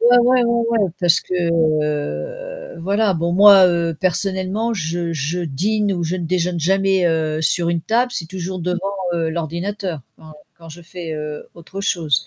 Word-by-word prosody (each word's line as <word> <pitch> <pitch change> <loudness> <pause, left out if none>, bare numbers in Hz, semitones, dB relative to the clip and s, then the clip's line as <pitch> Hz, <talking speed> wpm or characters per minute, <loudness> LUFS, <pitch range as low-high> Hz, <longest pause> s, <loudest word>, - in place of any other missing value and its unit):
Ouais, 240 +1 +6
ouais, 250 +1 +4
ouais, 235 0 +1
ouais 220 -4 +2
parce 175 -1 +4
que, - - -10
heu, 170 - -2
voilà, 200 +2 +1
bon 170 +1 -1
moi, 195 0 +8
heu, 170 -2 0
personnellement 190 +4 -1
je 170 -2 -3
je 155 +3 -2
dîne 200 +7 -1
ou 175 -2 -2
je 170 +2 -1
ne 175 - -4
déjeune 180 0 -1
jamais, 190 +2 +2
heu, 160 -2 0
sur 170 +2 +1
une 170 -1 0
table. 240 +8 +1
C'est 165 - -4
toujours 185 +1 -5
devant, 180 +1 -2 0.4
heu, 165 -1 -1
l'ordinateur 170 +2 -4 0.2
quand 155 -1 -14 0.2
quand 165 -1 -13
je 170 +2 -11
fais, 170 -1 -7
heu, 150 -1 -6
autre 175 +4 -9
chose. 160 -9 0
175 Hz, 175 wpm, -19 LUFS, 165-200 Hz, 0.4 s, moi